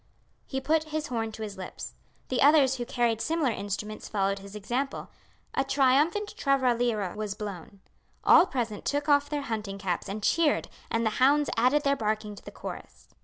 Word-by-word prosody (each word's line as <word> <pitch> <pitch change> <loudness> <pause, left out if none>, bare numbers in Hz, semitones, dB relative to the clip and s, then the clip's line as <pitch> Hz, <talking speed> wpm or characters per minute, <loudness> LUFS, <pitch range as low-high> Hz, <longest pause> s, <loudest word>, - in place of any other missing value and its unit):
He 265 - -2
put 315 +3 +1
his 310 0 -4
horn 225 -2 -2
to 220 - -6
his 205 -2 -6
lips. 185 - -7 0.4
The 255 - 0
others 275 -2 +5
who 240 -1 -4
carried 235 -3 +1
similar 315 -4 +1
instruments 210 +1 -5
followed 195 -1 0
his 200 +1 -11
example. 245 +7 -3 0.4
A 270 - +1
triumphant 285 +10 +2
traralira 245 - +1
was 210 -2 -3
blown. 200 -2 -7 0.4
All 370 - +7
present 230 - -3
took 290 +1 -1
off 285 -1 +4
their 290 -2 -2
hunting 215 -5 -4
caps 190 -1 -3
and 205 +1 -5
cheered, 325 +2 +2 0.2
and 230 0 0
the 220 - +2
hounds 290 +3 +4
added 255 +6 +3
their 280 -1 +3
barking 215 -3 -2
to 205 - -13
the - - -8
chorus. - - -9
240 Hz, 175 wpm, -28 LUFS, 210-285 Hz, 0.4 s, All